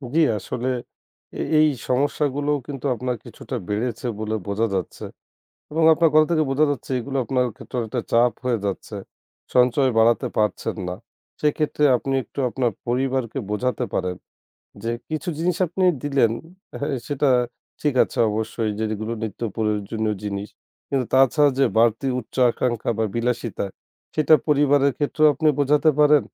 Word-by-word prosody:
জি, - - +5 0.2
আসলে 125 +4 -4 0.7
এ - - 0 0.2
এই 155 - +6 0.2
সমস্যাগুলোও 145 +2 +1
কিন্তু 140 -1 -6
আপনার 125 +1 -2
কিছুটা 130 - -7
বেড়েছে 115 +3 -2
বলে 110 0 -2
বোঝা 105 +3 0
যাচ্ছে 95 -3 -4 0.7
এবং 160 +1 +1
আপনার 165 0 +3
কথা 155 0 +6
থেকে 155 -2 +3
বোঝা 140 +3 +3
যাচ্ছে 140 -2 -4
এগুলো 135 +3 -4
আপনার 130 -1 +1
ক্ষেত্রও 125 -2 -4
একটা 120 +3 -2
চাপ 120 +1 +4
হয়ে 120 -3 +1
যাচ্ছে 100 +2 -4 0.6
সঞ্চয় 125 +2 +4
বাড়াতে 115 -1 +4
পারছেন 105 -3 0
না। 90 - -3 0.5
সেক্ষেত্রে 150 0 +1
আপনি 135 +3 -3
একটু 110 - -15
আপনার 120 -1 0 0.2
পরিবারকে 130 0 -1
বোঝাতে 125 +4 -1
পারেন, 90 -1 -1 0.7
যে 115 - -1 0.2
কিছু 155 +3 -3
জিনিস 175 +1 0
আপনি 185 +3 -2 0.2
দিলেন 140 -6 +2 0.5
হ্যাঁ, 140 -1 -1
সেটা 145 0 +1 0.5
ঠিক 150 -2 +1
আছে - - -9
অবশ্যই 110 +1 -2
যে 110 - 0
যেগুলো 110 +2 -3
নিত্য 110 -1 -5
প্রয়োজনীয় 105 0 -1
জিনিস 100 0 -4 0.4
কিন্তু 135 -2 0
তাছাড়া 135 +2 +5
যে 135 - +5
বাড়তি 115 +3 +3
উচ্চ 115 - -13 0.2
আকাঙ্ক্ষা 120 -2 -1
বা 115 - +1
বিলাসিতা 115 -2 -1 0.5
সেটা 155 0 +4
পরিবারের 145 -1 +4
ক্ষেত্রেও 155 +1 +3
আপনি 155 +1 0
বোঝাতে 145 +3 +4
পারেন। 150 -1 +6
125 Hz, 150 wpm, -23 LUFS, 115-145 Hz, 0.7 s, এই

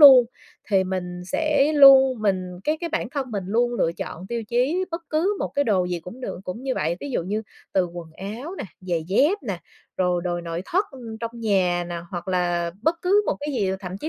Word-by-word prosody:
luôn, 265 -4 +11 0.5
thì 190 -2 +4
mình 180 -1 -4
sẽ 300 - +2
luôn 265 -4 +8
mình 185 -3 0
cái 305 +1 +1
cái 340 - -2
bản 285 -7 -1
thân 270 -3 -3
mình 200 -4 -3
luôn 240 +4 +1
lựa 170 -7 +1
chọn 175 +2 -7
tiêu 235 +1 -3
chí 270 +10 +1
bất 330 +1 -4
cứ 365 +7 +1
một - - -1
cái 285 - +2
đồ 200 -7 +2
gì 180 -1 -2
cũng 180 +10 -10
được 220 - -5
cũng 225 +8 -5
như 265 -1 -1
vậy, 165 +3 0
ví 285 - -5
dụ 240 - 0
như 210 +5 -2 0.3
từ 185 -2 +3
quần 170 -1 -8
áo 230 - -6
nè, - - -3 0.2
giày 175 -4 -2
dép 295 - +3
nè, 195 -8 -3 0.4
rồi 180 -1 +1
đồ 175 -1 -1
nội 170 0 -4
thất 380 +5 +2 0.4
trong 230 -1 -3
nhà 190 -6 +1
nè 175 - -4
hoặc 175 -1 -5
là 175 -2 0
bất 330 +3 +1
cứ 400 +3 +4
một - - 0
cái 290 - -4
gì, 200 -5 +1
thậm 185 -1 -6
chí 310 - -3
210 Hz, 225 wpm, -24 LUFS, 180-275 Hz, 0.5 s, luôn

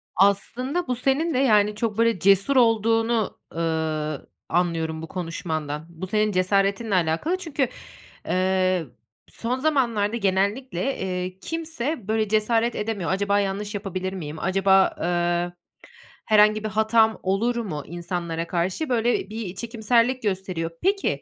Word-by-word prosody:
Aslında 250 - +1
bu 250 - 0
senin 275 +6 +1
ve, 255 - +1
yani, 210 -5 +4
çok, 215 -1 -2
böyle, 230 -3 +2
cesur 200 +8 +4
olduğunu, 225 -1 +2 0.2
ııı, 160 -2 -2 0.2
anlıyorum 165 -2 0
bu 165 - -6
konuşmandan. 160 -4 -4
Bu, 170 +3 -7
senin 215 +1 +1
cesaretinle 195 +3 +1
alakalı 175 - +1
çünkü, 290 -7 -1 0.6
eee, 185 -2 +1 0.4
son 250 +3 -3
zamanlarda 235 -8 +1
genellikle, 200 +4 0
eee, 185 0 -3
kimse 315 -7 -4
böyle 220 -1 +1
cesaret 225 +2 +1
edemiyor. 210 -5 -2
Acaba 200 +1 +1
yanlış 205 +2 -2
yapabilir 190 -1 -4
miyim, 155 -4 -6
acaba, 190 +1 +3
eee, 175 0 0 0.7
herhangi 215 0 +4
bir 215 - -2
hatam 220 +1 +3
olur 210 +6 +1
mu 185 -11 -3
insanlara 170 -1 -4
karşı, 185 - -1
böyle, 235 -4 +1
bir 215 -4 -5
çekimserlik 235 +3 +1
gösteriyor. 185 -4 -2
Peki, 395 +1 +1
200 Hz, 125 wpm, -24 LUFS, 180-230 Hz, 0.7 s, yani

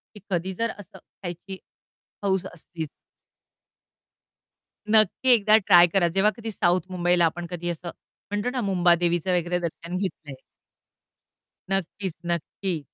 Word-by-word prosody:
की - - -10
कधी 185 0 -1
जर 230 +5 -1
असं 205 -4 -13 0.3
खायची 180 +2 -6 0.7
हौस 190 -2 0
असलीच. 160 -1 -7 2.0
नक्की 220 +4 +3
एकदा 215 -1 +5
ट्राय 180 -4 +6
करा. 175 0 +2
जेव्हा 195 +5 +3
कधी 225 -1 -5
साउथ 180 -2 +2
मुंबईला 175 -1 +3
आपण 170 +2 -2
कधी 175 -1 -4
असं 170 +1 -5 0.4
म्हणतो 205 +3 -1
ना 250 -1 -2
मुंबादेवीचं 175 -2 +2
वगैरे 175 +1 -1
दर्शन 170 +1 -4
घेतलंय. 160 -7 -4 1.4
नक्कीच, 195 0 -2
नक्की. 170 +1 -2
180 Hz, 120 wpm, -25 LUFS, 175-200 Hz, 2.0 s, ट्राय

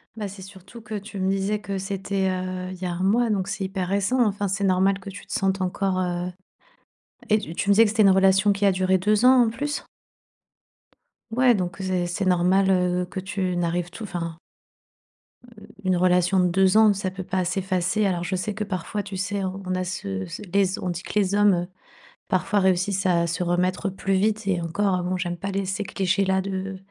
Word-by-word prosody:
Bah, 215 -2 -4
c'est 195 0 -10
surtout 195 +4 -12
que 215 0 -7
tu 200 0 -7
me 190 0 +1
disais 195 +2 0
que 195 0 -4
c'était, 195 0 -2
heu, 185 0 -4
il 185 - -10
y 185 - -2
a 180 - -2
1 175 +2 -3
mois, 230 +4 +3
donc 195 -3 0
c'est 195 -1 -3
hyper 190 -1 -3
récent. 200 +7 +2
Enfin, 205 -1 -1
c'est 195 +2 -2
normal 195 +1 +2
que 195 - -9
tu 200 - -11
te - - -13
sentes 195 -1 0
encore 185 0 -1
heu, 180 0 -2 1.0
et 215 - +4
tu 165 -6 -7
tu 200 - -2
me 200 - +6
disais 225 +3 +7
que 210 - +1
c'était 220 0 +3
une 195 - +6
relation 190 +1 +4
qui 200 +1 -2
a 200 - +5
duré 185 0 +2
2 210 +4 +2
ans 255 -1 +7
en - - 0
plus? 290 +5 -3 1.5
Ouais, 250 +1 +4
donc 180 -3 -2
c'est 185 -2 -1
c'est 175 +3 -3
normal, 185 +2 +3
heu, 180 -1 +1
que 180 - -6
tu 185 -1 -2
n'arrives 175 0 -1
tout 185 +6 -9
enfin 170 -4 -5 1.1
Heu, 230 -3 -15 0.2
une 185 -1 +2
relation 180 +1 +3
de 180 - +4
2 190 +3 +3
ans, 220 -1 +6
ça 195 -1 -3
peut 190 0 -6
pas 185 0 -1
s'effacer. 185 +2 0
Alors 180 -3 0
je 185 +2 -2
sais 200 +3 -2
que 210 +1 -3
parfois, 205 +1 -4
tu 195 -1 -7
sais, 200 +1 -2
on 190 0 -3
a 185 - -1
ce 100 - -4
ce 85 - -8
les 200 0 +4
z 190 +1 -3
on 180 - -2
dit 175 +1 -4
que - - -8
les 200 0 +1
hommes, 205 -1 +5
heu, 175 0 -1 0.6
parfois 210 -2 +1
réussissent 190 +1 +1
à 170 -2 +2
se 170 +2 -2
remettre 180 +2 0
plus 195 +1 -2
vite. 215 +2 +1
Et 185 -3 +1
encore, 185 +3 0
heu - - -3
bon, 180 +1 -1
j'aime 175 -1 -3
pas 195 +4 -4
les 195 0 -1
ces 195 +2 -2
clichés-là 190 0 +1
de 190 0 -4
190 Hz, 225 wpm, -24 LUFS, 180-200 Hz, 1.5 s, disais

